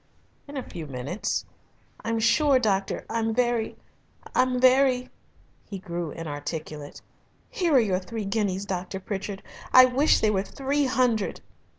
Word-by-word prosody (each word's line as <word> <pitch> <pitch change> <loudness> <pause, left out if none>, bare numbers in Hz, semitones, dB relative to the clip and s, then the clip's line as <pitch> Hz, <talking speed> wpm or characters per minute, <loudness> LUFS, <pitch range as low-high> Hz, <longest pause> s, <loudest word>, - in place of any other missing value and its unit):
"In 285 0 -7
a 260 - -5
few 160 -3 -7
minutes." 140 - -3 0.6
"I'm 230 0 -1
sure, 275 +5 +4
doctor, 200 -5 0
I'm 225 -1 -1
very 240 -2 0 0.6
I'm 255 -1 +2
very 255 0 +4 0.3
" - - -34
he 200 - -5
grew 175 -3 -4
inarticulate. 150 -1 -6 0.5
"Here 360 - +1
are - - +8
your 195 -6 +1
three 215 +3 -5
guineas, 195 -2 -1
Dr. 190 0 -4
Pritchard. 195 0 -5 0.3
I 255 0 +9
wish 265 +4 +3
they 215 - +2
were 190 -2 +1
three 275 +7 -1
hundred." 250 -5 +1
220 Hz, 145 wpm, -26 LUFS, 185-255 Hz, 0.6 s, I